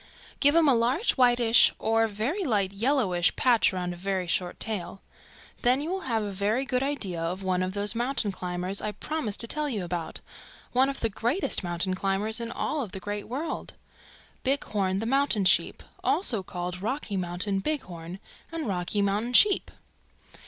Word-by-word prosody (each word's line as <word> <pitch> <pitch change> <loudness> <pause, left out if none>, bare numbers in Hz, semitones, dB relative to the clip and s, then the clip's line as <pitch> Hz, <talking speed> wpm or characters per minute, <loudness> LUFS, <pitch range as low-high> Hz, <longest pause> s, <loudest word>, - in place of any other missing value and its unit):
Give 285 +2 +4
him 330 -2 +5
a 275 - +6
large 250 - +2
whitish 240 -2 +5
or 225 +1 +2
very 230 - -2
light 205 - 0
yellowish 200 -6 +2
patch 245 -3 +4
around 180 -1 -3
a - - -8
very 190 +1 -2
short 175 +1 -1
tail. 195 -3 -4 0.6
Then 250 +2 +3
you 310 +4 -3
will 380 - -1
have 225 -2 +1
a 205 - -3
very 205 +7 0
good 255 -1 0
idea 215 -12 -2
of 180 +4 -3
one 185 -1 0
of 185 0 -2
those 205 +1 0
mountain 240 -2 0
climbers 180 +1 -3
I 210 - -3
promised 300 -9 -3
to 230 - -1
tell 300 +3 -1
you 210 -8 -2
about, 170 -2 -4 0.5
one 260 +2 +3
of 275 - -5
the 225 - +1
greatest 235 - 0
mountain 175 +1 -1
climbers 195 +4 +1
in 230 - -4
all 285 -7 -2
the 190 0 -8
Great 205 +1 -5
World 285 +7 -4 0.7
Bighorn 205 -8 0
the 220 - -2
Mountain 265 -5 +2
Sheep, 185 - +2 0.2
also 245 - +2
called 180 0 -5
Rocky 225 -1 -3
Mountain 185 +2 -2
Bighorn 185 - -4 0.3
and 330 -5 -3
Rocky 195 +1 -1
Mountain 210 +5 0
Sheep. 405 +8 +5
210 Hz, 175 wpm, -27 LUFS, 185-255 Hz, 0.7 s, a